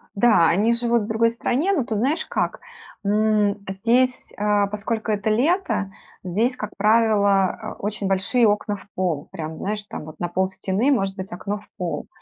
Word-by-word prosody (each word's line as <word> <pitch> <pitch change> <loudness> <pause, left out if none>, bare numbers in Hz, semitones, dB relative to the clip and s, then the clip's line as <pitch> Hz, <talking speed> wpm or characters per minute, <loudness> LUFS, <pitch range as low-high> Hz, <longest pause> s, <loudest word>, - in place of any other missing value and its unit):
Да, 200 -6 +5
они 210 +7 +3
живут 235 -1 +1
в - - -6
другой 230 +1 +2
стране, 260 +9 0
но 300 -11 +1
тут 215 -3 -2
знаешь 280 +8 0
как? - - -2 0.5
М, 210 -1 +2
здесь, 235 +6 +1
а, 205 -1 +2
поскольку 215 +2 -3
это 205 +1 0
лето, 245 - +1 0.3
здесь, 220 +8 0
как 210 -3 -5
правило, 205 -3 +3 0.2
э, - - -28
очень 205 -1 -2
большие 195 +6 +2
окна 210 0 +1
в 200 - -13
пол. 170 -6 -2
Прям, 160 -3 -6
знаешь, 210 +3 -3
там - - -7
вот 155 - -11
на 175 - -1
полстены 190 +7 0
может 195 -7 +1
быть 190 -1 -7
окно 200 +4 -4
в 210 - -20
пол. 175 -2 -3
210 Hz, 175 wpm, -23 LUFS, 195-230 Hz, 0.5 s, Да